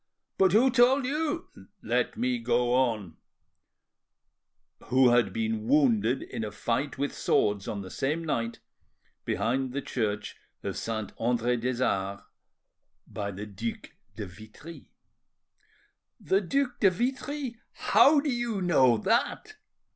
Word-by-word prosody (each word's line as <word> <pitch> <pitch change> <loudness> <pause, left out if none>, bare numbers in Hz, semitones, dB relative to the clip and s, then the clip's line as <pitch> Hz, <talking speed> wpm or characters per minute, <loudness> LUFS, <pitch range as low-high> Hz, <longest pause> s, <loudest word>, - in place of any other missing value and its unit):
"But 190 -2 +4
who 250 +5 +5
told 255 +2 +4
you—?" 300 +3 -1 0.4
"Let - - 0
me 250 +1 0
go 125 - +1
on: 115 -9 0 1.7
who 130 0 +4
had 120 -5 +3
been 110 +1 -2
wounded 125 -4 +3
in 110 - -5
a 105 - -4
fight 120 +6 -2
with 140 +1 -2
swords 105 -1 +1
on 100 -2 -4
the 95 - -10
same 150 +9 -1
night 115 -7 -2 0.7
behind 130 +2 -1
the 140 - -2
church 105 -4 -3 0.3
of - - -3
Saint 110 -3 -4
Andre 120 +1 +1
des 125 +1 -1
Arts 100 +1 -2 0.8
by 100 -1 -5
the 100 +1 -6
Duc 105 +3 -6 0.2
de 105 - -5
Vitry." 110 - -12 1.3
"The 195 +1 +1
Duc 250 +4 -1
de 200 - +6
Vitry!—How 265 - +1
do 285 -1 -1
you 240 -4 -2
know 130 -10 +4
that?" 235 - 0
130 Hz, 125 wpm, -28 LUFS, -, 1.7 s, de